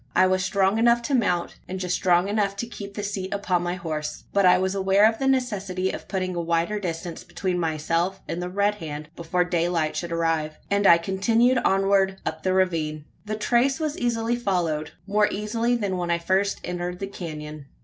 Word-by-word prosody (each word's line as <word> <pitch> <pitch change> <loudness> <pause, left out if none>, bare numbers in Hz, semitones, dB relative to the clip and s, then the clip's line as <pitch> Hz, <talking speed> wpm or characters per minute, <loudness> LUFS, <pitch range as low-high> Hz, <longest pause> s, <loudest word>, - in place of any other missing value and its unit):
I 185 - +6
was 185 0 +2
strong 195 +2 +2
enough 235 +1 +4
to 280 - -2
mount, 180 -9 0
and 190 +1 -5
just 180 -1 -1
strong 180 0 +3
enough 200 -1 0
to 200 - -3
keep 200 -4 -9
the 205 - -4
seat 195 -2 -4
upon 195 -3 0
my 175 0 -2
horse; 155 -4 -4
but 200 -2 +4
I 180 - +6
was 190 +1 0
aware 195 +2 +4
of 225 0 -1
the 270 - 0
necessity 195 -8 0
of - - -8
putting 185 -2 -2
a 170 - -1
wider 170 +5 0
distance 170 -2 -5
between 185 -2 -2
myself 165 +3 -1
and 175 - -3
the 180 - -3
Red 200 +2 +1
Hand 150 -1 -6
before 170 +2 0
daylight 170 -2 0
should 170 -1 -3
arrive; 165 -2 0
and 200 0 +3
I 170 - +8
continued 225 +8 +2
onward 195 -1 +2
up 160 0 -3
the 185 - +1
ravine. 160 -5 0 0.2
The 215 +1 -3
trace 245 +6 +2
was 310 -2 -1
easily 235 -1 0
followed 175 -9 -1 0.2
more 210 +1 +3
easily 230 +4 0
than 200 -5 -1
when 175 -1 -2
I 170 - +2
first 190 +4 0
entered 180 0 -4
the 195 - -4
canon. 155 -6 -7
190 Hz, 200 wpm, -25 LUFS, 170-205 Hz, 0.2 s, I